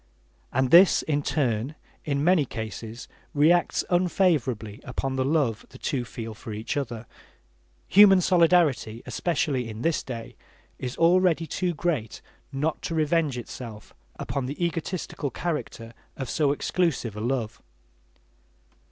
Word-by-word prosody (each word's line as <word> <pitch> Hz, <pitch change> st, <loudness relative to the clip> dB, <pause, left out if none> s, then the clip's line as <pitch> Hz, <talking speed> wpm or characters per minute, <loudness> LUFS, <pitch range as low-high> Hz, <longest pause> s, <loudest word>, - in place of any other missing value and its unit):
And 130 Hz, 0 st, +1 dB
this, 180 Hz, +3 st, +7 dB
in 145 Hz, -2 st, 0 dB
turn, 130 Hz, -2 st, -1 dB, 0.3 s
in 140 Hz, -1 st, 0 dB
many 175 Hz, -2 st, +4 dB
cases 110 Hz, -1 st, -7 dB, 0.3 s
reacts 165 Hz, +4 st, +3 dB
unfavorably 160 Hz, -, +1 dB
upon 130 Hz, 0 st, -3 dB
the 130 Hz, -, +1 dB
love 135 Hz, -6 st, +1 dB
the 130 Hz, -, -13 dB
two 130 Hz, -1 st, -2 dB
feel 115 Hz, -2 st, -7 dB
for 110 Hz, -, -9 dB
each 110 Hz, +3 st, -4 dB
other. 120 Hz, -5 st, -4 dB, 0.8 s
Human 195 Hz, -1 st, +7 dB
solidarity, 165 Hz, -10 st, +3 dB
especially 140 Hz, -8 st, -1 dB
in 110 Hz, +2 st, -7 dB
this 165 Hz, -2 st, +1 dB
day, 115 Hz, -3 st, -7 dB, 0.4 s
is 125 Hz, 0 st, -5 dB
already 170 Hz, -1 st, +3 dB
too 175 Hz, +1 st, -2 dB
great 145 Hz, -, -2 dB, 0.3 s
not 150 Hz, +4 st, -2 dB
to 165 Hz, -, -3 dB
revenge 155 Hz, -3 st, +1 dB
itself 115 Hz, -3 st, -8 dB, 0.2 s
upon 135 Hz, -2 st, -3 dB
the 150 Hz, +6 st, -2 dB
egotistical 165 Hz, -3 st, -3 dB
character 130 Hz, -8 st, -4 dB, 0.2 s
of 135 Hz, -3 st, -4 dB
so 145 Hz, -3 st, +2 dB
exclusive 145 Hz, -, -1 dB
a 105 Hz, -, -5 dB
love. 120 Hz, -2 st, -2 dB
140 Hz, 130 wpm, -26 LUFS, 120-165 Hz, 0.8 s, this